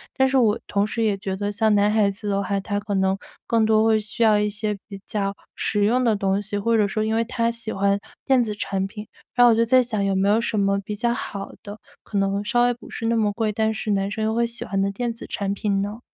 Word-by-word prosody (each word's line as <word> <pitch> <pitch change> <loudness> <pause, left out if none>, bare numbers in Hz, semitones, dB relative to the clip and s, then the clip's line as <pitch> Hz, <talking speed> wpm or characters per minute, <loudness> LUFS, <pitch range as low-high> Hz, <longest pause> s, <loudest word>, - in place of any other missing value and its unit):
但 265 -1 +3
是 270 - +2
我 220 -4 +3
同 200 0 +1
时 230 +2 -3
也 210 -3 +1
觉 190 0 -4
得， 205 +1 -2
像 215 +1 +2
男 205 0 +4
孩 210 -2 +3
子 205 +2 -8
的 200 0 0
话， 200 0 -1
他 205 +1 -2
可 205 0 -4
能 190 0 +1 0.3
更 225 -1 +3
多 215 0 +4
会 220 -1 +4
需 210 +2 -7
要 215 -2 +5
一 210 - +1
些 210 0 -3
比 200 -2 -8
较 200 -1 -2 0.2
实 205 -1 0
用 245 +4 +2
的 230 -3 +3
东 195 -1 0
西。 205 0 -5
或 230 +3 +1
者 210 -2 +3
说 215 +2 -1
因 220 +1 0
为 230 - +2
他 230 0 -1
喜 230 -1 -4
欢 200 +1 +1 0.3
电 260 -3 +4
子 215 - -3
产 195 -2 -2
品， 210 +2 -8 0.3
然 245 - +5
后 240 - +7
我 225 - +4
就 230 - +3
在 255 +2 +5
想 220 -4 -2
有 195 - +1
没 195 +1 +2
有 215 +2 +4
什 230 -2 -1
么 200 0 +2
比 205 +1 -5
较 235 +3 0
好 200 -4 -5
的， 205 +1 -9 0.2
可 205 - -4
能 195 +1 0
稍 240 +2 +2
微 245 0 +3
不 235 - -14
是 225 - -4
那 230 - +2
么 215 -2 +2
贵， 215 0 -1
但 220 +1 0
是 215 0 -3
男 195 -1 0
生 220 +2 -3
又 220 +1 0
会 235 0 +2
喜 235 0 -3
欢 195 -4 -2
的 195 0 +1
电 235 +4 -2
子 230 - -9
产 200 -1 -2
品 200 -1 0
呢？ 205 +3 -4
210 Hz, 300 characters per minute, -23 LUFS, 200-230 Hz, 0.3 s, 后